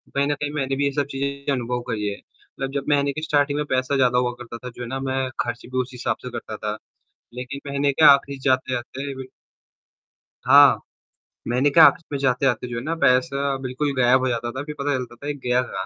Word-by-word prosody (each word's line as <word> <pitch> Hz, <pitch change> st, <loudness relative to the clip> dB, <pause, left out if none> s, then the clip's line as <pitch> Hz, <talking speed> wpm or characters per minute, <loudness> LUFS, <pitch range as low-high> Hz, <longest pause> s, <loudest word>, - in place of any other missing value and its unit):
कहीं 140 Hz, 0 st, +2 dB
न 145 Hz, -, +1 dB
कहीं 145 Hz, 0 st, -4 dB
मैंने 135 Hz, -2 st, -1 dB
भी 140 Hz, +1 st, 0 dB
ये 140 Hz, -, +1 dB
सब 145 Hz, -2 st, +1 dB
चीज़ें 140 Hz, +1 st, -2 dB
अनुभव 125 Hz, -1 st, -2 dB
करी 105 Hz, -3 st, -2 dB
है, 100 Hz, -, -5 dB
मतलब 135 Hz, 0 st, -9 dB
जब 140 Hz, -1 st, -2 dB
महीने 140 Hz, -1 st, +2 dB
की 155 Hz, -, -5 dB
स्टार्टिंग 145 Hz, -2 st, +1 dB
में 150 Hz, -, -1 dB
पैसा 130 Hz, +2 st, 0 dB
ज़्यादा 125 Hz, -2 st, +3 dB
हुआ 125 Hz, 0 st, +1 dB
करता 120 Hz, -1 st, -8 dB
था 125 Hz, +1 st, -8 dB
जो 125 Hz, -, -12 dB
है -, -, -6 dB
ना 135 Hz, +1 st, -3 dB
मैं 130 Hz, -1 st, -2 dB
खर्च 120 Hz, -, -3 dB
भी 130 Hz, +1 st, -6 dB
उस 125 Hz, -, -6 dB
हिसाब 125 Hz, -, -2 dB
से -, -, -4 dB
करता 110 Hz, -2 st, -6 dB
था। 105 Hz, 0 st, -4 dB, 0.6 s
लेकिन 125 Hz, +2 st, -6 dB
महीने 140 Hz, 0 st, +1 dB
के 155 Hz, -, +3 dB
आखिर 140 Hz, 0 st, 0 dB
जाते 130 Hz, -1 st, +1 dB
जाते 135 Hz, +3 st, -5 dB
बिल 130 Hz, -1 st, -8 dB, 1.2 s
हाँ। -, -, +8 dB, 0.7 s
महीने 125 Hz, +4 st, +2 dB
के 145 Hz, -, +3 dB
आख़िर 165 Hz, -, +6 dB
में 145 Hz, -, -1 dB
जाते-जाते 125 Hz, -2 st, +1 dB
जो 120 Hz, -1 st, -5 dB
है 115 Hz, -, -4 dB
ना 160 Hz, +4 st, -2 dB
पैसा 140 Hz, +1 st, +2 dB
बिल्कुल 130 Hz, +3 st, -2 dB
गायब 125 Hz, +1 st, +5 dB
हो 130 Hz, -, 0 dB
जाता 120 Hz, -1 st, -2 dB
था। 130 Hz, +3 st, -5 dB
फिर 150 Hz, 0 st, -7 dB
पता 145 Hz, +1 st, 0 dB
चलता 125 Hz, -2 st, -5 dB
था 145 Hz, -, -9 dB
कि 145 Hz, -, -1 dB
गया 125 Hz, 0 st, +2 dB
कहाँ, 125 Hz, -, -5 dB
130 Hz, 235 wpm, -23 LUFS, 125-140 Hz, 1.2 s, हाँ